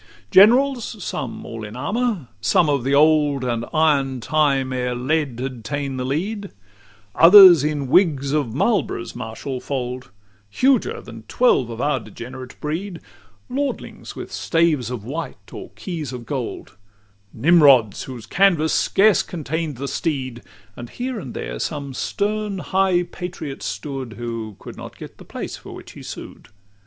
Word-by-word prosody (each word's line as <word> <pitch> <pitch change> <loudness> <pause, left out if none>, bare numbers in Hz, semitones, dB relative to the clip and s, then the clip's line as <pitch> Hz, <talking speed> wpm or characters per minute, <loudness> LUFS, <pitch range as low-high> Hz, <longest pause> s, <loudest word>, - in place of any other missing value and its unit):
LXX - - -26
Generals, 235 0 +4
some 120 - -5
all 115 -1 -7
in 105 +1 -8
armour, 210 - -1 0.3
of 150 -8 +3
the 135 +2 +1
old 150 -2 +4
And 120 -2 -1
iron 140 -5 +2
time, 135 -1 +1
ere 125 -1 -1
lead 135 -1 -1
had 130 -3 -5
ta'en 140 +1 -3
the 125 - -2
lead; 195 +10 -3 0.6
Others 175 -3 +9
in 150 -2 -1
wigs 140 -2 +3
of 145 -6 0
Marlborough's 140 - -1
martial 120 +3 -5
fold, 125 -5 -4 0.4
Huger 255 - +1
than 115 -1 -11
twelve 185 - +2
of 115 0 -7
our 145 0 +1
degenerate 125 +4 -10
breed: 170 +4 -4 0.5
Lordlings, 275 +2 -4
with - - -8
staves 165 -8 +1
of 125 -5 -5
white 150 +8 -7
or - - -8
keys 160 -8 -5
of 125 -2 -7
gold: 130 -6 -5 0.5
Nimrods, 140 - +4
whose 125 -4 -8
canvass 170 - +3
scarce 205 0 +4
contain'd 160 -3 -4
the 140 +2 -4
steed; 130 -6 -3 0.3
And 120 -1 -8
here 250 -2 -4
and 130 -10 -8
there - - -5
some 140 -3 -4
stern 210 +7 -2
high 185 -1 +1
patriot 175 -6 -7
stood, 130 +2 -5
Who 115 -2 -5
could - - -10
not - - -10
get - - -11
the - - -12
place - - -6
for - - -11
which - - -11
he - - -12
sued. - - -9
145 Hz, 150 wpm, -21 LUFS, 125-175 Hz, 0.6 s, Others